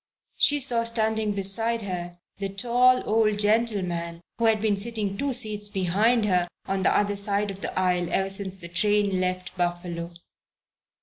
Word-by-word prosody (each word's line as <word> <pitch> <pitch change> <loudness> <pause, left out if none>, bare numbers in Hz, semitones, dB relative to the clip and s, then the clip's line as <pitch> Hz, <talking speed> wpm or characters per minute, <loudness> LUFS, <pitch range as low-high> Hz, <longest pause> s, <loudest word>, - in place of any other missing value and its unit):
She 290 0 +4
saw 245 -4 +4
standing 220 -2 0
beside 220 +4 +2
her 175 -2 -6 0.2
the 195 -1 -3
tall 245 +5 +2
old 215 -1 +2
gentleman 195 -6 0 0.2
who 230 - +1
had 220 -1 +2
been 210 -1 +1
sitting 210 -1 -1
two 280 +6 -2
seats 215 -4 0
behind 205 +5 +1 0.4
on 195 0 -2
the 190 - +2
other 205 0 0
side 200 0 +1
of 195 0 -11
the - - -5
aisle 180 -1 0
ever 195 0 0
since 195 -1 -3
the 170 -2 -8
train 200 +2 0
left 185 0 -3
Buffalo. 175 -1 -3
200 Hz, 160 wpm, -25 LUFS, 185-220 Hz, 0.4 s, She